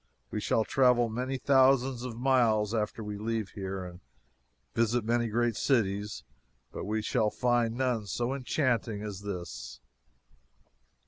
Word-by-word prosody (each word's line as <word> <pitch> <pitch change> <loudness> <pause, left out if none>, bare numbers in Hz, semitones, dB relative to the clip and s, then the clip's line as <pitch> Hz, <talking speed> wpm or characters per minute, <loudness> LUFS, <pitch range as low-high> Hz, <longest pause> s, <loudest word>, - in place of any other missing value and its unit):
We - - -2
shall 110 - +2
travel 125 -1 +3
many 125 +4 -2
thousands 130 -2 +3
of 125 -2 -6
miles 115 -5 +2
after 110 0 -2
we 105 -1 -5
leave 110 -1 -2
here 95 -1 -5
and 90 -1 -10 0.7
visit 115 0 +1
many 120 +1 +1
great 120 +1 +1
cities, 105 -5 0 0.5
but - - -6
we 110 +1 -1
shall 110 -1 +1
find 120 -1 +1
none 125 -5 0
so 120 +6 -1
enchanting 120 -5 -1
as 100 -2 -6
this. 85 -11 -6
115 Hz, 135 wpm, -30 LUFS, 105-125 Hz, 0.7 s, travel